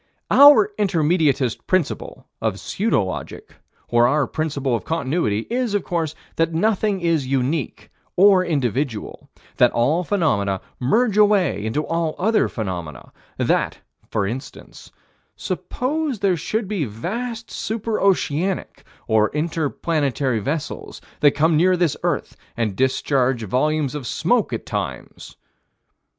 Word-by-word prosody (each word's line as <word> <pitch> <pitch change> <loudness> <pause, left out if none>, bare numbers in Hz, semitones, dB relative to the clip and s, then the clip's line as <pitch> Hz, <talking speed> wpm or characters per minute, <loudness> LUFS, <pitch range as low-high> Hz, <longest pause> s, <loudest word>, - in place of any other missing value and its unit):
Our 275 -8 +8
Intermediatist 160 - +1
principle 185 -5 -1 0.2
of 110 -3 -1
pseudo 205 - 0
logic, 95 - -7 0.3
or 120 0 +4
our 145 +2 +2
principle 140 -4 -2
of - - -4
Continuity 140 -8 -1
is, 240 -3 -1
of 205 - 0
course, 160 -3 -2 0.2
that 165 0 +1
nothing 205 +1 +1
is 165 -6 +1
unique, 135 +2 -2 0.2
or 190 0 +6
individual: 135 - -2 0.3
that - - +6
all 145 +9 +2
phenomena 105 - 0 0.2
merge 215 - +2
away 200 - +3
into 130 +8 -1
all 165 -1 -1
other 220 +4 +2
phenomena: 90 - -6 0.3
that, - - 0 0.3
for 100 - 0
instance 120 +7 -8 0.5
suppose 290 0 -2
there 195 -2 +2
should 215 +6 -2
be 200 -5 -1
vast 220 - -5
celestial - - -5
super 225 0 -2
oceanic, 185 -1 0 0.2
or 110 -1 +3
inter 155 +1 -1
planetary 140 -7 -1
vessels 145 +8 -4 0.2
that 145 -1 +4
come 160 +2 +3
near 180 +3 +4
this 170 -4 +1
earth - - -2 0.2
and 110 -4 -1
discharge 130 -1 +1
volumes 145 +6 0
of 145 -5 -5
smoke - - +1
at - - -4
times. - - -6
155 Hz, 130 wpm, -21 LUFS, 130-190 Hz, 0.5 s, Our